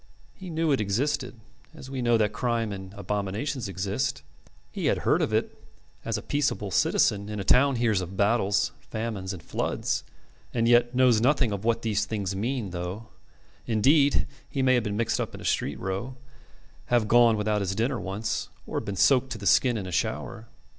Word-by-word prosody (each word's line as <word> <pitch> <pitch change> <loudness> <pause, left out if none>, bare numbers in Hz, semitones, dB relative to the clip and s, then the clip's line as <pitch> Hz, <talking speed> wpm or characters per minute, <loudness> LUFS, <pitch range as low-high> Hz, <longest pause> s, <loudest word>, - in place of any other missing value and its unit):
He 190 -1 -10
knew 160 -1 0
it 135 - +2
existed, 125 +4 -1 0.4
as 135 -4 -10
we 130 -2 -3
know 120 -1 +3
that 105 -1 +1
crime 115 -1 -1
and 95 -1 -7
abominations 105 +6 -3
exist; 95 +1 -2 0.5
he - - -2
had - - 0
heard - - +3
of - - 0
it - - -2 0.4
as - - -1
a - - -7
peaceable 140 -9 -1
citizen 100 +3 +2
in 105 -1 -4
a - - -2
town 135 +6 +4
hears 115 -5 +1
of 90 +2 -7
battles, 100 -1 +2
famines, 110 -4 -4
and 90 -5 -8
floods, - - -2 0.5
and 115 -1 +2
yet 120 +1 +4
knows 125 -4 +4
nothing 130 -2 +3
of 100 0 -4
what 115 0 +1
these 105 -2 0
things 100 -3 -3
mean 115 -1 -2
though, 90 +5 -5 0.6
indeed, 140 +6 +3 0.2
he 135 - -1
may 130 0 +4
have 120 -2 +2
been 105 -1 -2
mixed 115 0 0
up - - -4
in - - -9
a - - -8
street 70 -2 -1
row, 95 +7 -4 0.7
have 120 -3 +2
gone 120 -1 +5
without 105 0 0
his 95 0 -2
dinner 120 +4 0
once, 100 +3 -3 0.2
or - - -3
been 100 - -5
soaked 130 +6 +4
to - - -6
the 100 - -9
skin 120 +3 +4
in 100 - -4
a 90 - -6
shower. 110 +3 -3
110 Hz, 190 wpm, -27 LUFS, 100-125 Hz, 0.7 s, gone